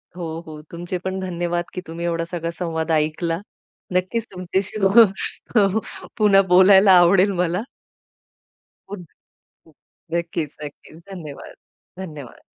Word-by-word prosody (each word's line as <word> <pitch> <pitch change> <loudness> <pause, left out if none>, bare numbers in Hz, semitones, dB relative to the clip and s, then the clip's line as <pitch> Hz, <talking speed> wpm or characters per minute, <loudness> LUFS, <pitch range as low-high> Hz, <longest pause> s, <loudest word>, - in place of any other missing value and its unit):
हो, 165 -2 -5
हो. 155 -1 -9
तुमचे 175 +2 -4
पण 190 +1 -4
धन्यवाद 175 -1 -2
की 180 - -4
तुम्ही 170 +1 -5
एवढा 165 -1 -1
सगळा 170 -1 -3
संवाद 165 -2 -2
ऐकला. 160 +2 0 0.5
नक्कीच 190 +5 0
तुमच्याशी 190 +3 -3
हो 200 0 +3 0.4
पुन्हा 200 -2 +5
बोलायला 190 +2 +7
आवडेल 185 +3 +5
मला. 180 +2 -1 1.3
पुन्ह 185 -5 -12 0.8
नक्कीच, 165 -3 -2
नक्कीच. 150 +2 -11
धन्यवाद, 155 -7 -9 0.4
धन्यवाद. 150 -9 -9
175 Hz, 110 wpm, -21 LUFS, 165-190 Hz, 1.3 s, बोलायला